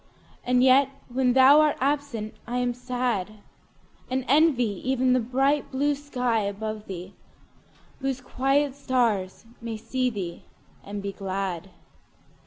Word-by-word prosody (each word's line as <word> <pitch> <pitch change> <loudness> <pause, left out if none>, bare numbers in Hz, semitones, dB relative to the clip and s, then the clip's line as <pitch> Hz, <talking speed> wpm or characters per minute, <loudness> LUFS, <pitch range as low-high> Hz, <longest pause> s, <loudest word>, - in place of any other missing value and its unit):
And 250 0 +3
yet 265 +1 +5 0.2
when 250 0 +1
thou 265 +3 +7
art 305 -1 +2
absent 275 -6 -1
I 245 +1 -2
am 245 -1 0
sad; 245 -5 -2 0.8
And 260 0 -1
envy 255 - +3
even 260 -1 +2
the 255 - +3
bright 270 +5 +1
blue 285 +2 +1
sky 250 -5 -1
above 210 +1 -4
thee, 185 0 -7 0.9
Whose 270 -1 -2
quiet 270 +2 0
stars 235 -9 -1 0.2
may 230 -1 -4
see 255 +3 -1
thee 185 -7 -5 0.4
and 200 0 -6
be 200 - -3
glad. 190 -2 -4
250 Hz, 130 wpm, -26 LUFS, 215-265 Hz, 0.9 s, thou